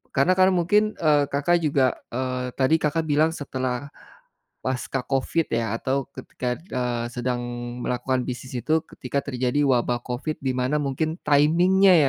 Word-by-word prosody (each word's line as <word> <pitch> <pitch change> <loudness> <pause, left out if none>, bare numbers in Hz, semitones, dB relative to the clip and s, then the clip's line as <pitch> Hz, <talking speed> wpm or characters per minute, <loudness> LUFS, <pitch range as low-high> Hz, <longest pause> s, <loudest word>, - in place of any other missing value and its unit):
karena 140 +7 +4
kan 185 0 +7
mungkin, 210 +5 +2
eee, 150 -3 +3
Kakak 145 +5 +2
juga 140 -4 +3 0.2
eee, 125 0 -2
tadi 135 +4 +4
Kakak 155 +2 +1
bilang 155 +2 +3
setelah 130 -1 -3 0.7
pasca 130 0 -2
Covid 140 +4 0
ya 115 -1 0
atau 135 0 -1
ketika 125 -1 -4
eee, 125 -8 -2
sedang 125 0 -2 0.4
melakukan 125 +1 0
bisnis 125 +1 -6
itu 155 +6 +2
ketika 130 +2 -3
terjadi 130 +1 0
wabah 120 -2 +2
Covid 130 +5 -3
di 130 -1 0
mana 130 +4 +1
mungkin 155 +4 -1
timing-nya 175 +6 +5
135 Hz, 145 wpm, -24 LUFS, 125-155 Hz, 0.7 s, kan